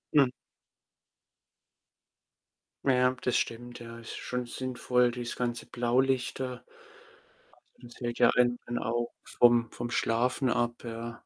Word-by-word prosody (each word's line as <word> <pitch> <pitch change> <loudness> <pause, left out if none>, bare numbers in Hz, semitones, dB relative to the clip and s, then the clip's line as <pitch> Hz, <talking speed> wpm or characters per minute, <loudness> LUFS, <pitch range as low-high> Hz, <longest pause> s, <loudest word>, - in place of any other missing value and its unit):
Hm. 135 -3 +6 2.6
Ja, 125 -1 +4
das 125 - +1
stimmt, 120 +1 -2
ja, 115 0 -9
ist 115 - -8
schon 125 -1 -3
sinnvoll, 125 0 +1
dieses 120 -1 -5
ganze 120 -1 -2
Blaulichter. 125 +1 0 1.1
Also, 120 - -14
das 120 - -14
hält 120 -1 -3
ja - - +6
einen 120 0 +3
dann 120 0 -2
auch 120 +1 -1
vom 120 -1 +4
vom 120 0 -5
Schlafen 125 +2 +1
ab, 120 -1 0
ja. 115 0 -6
120 Hz, 125 wpm, -29 LUFS, 120-125 Hz, 2.6 s, Hm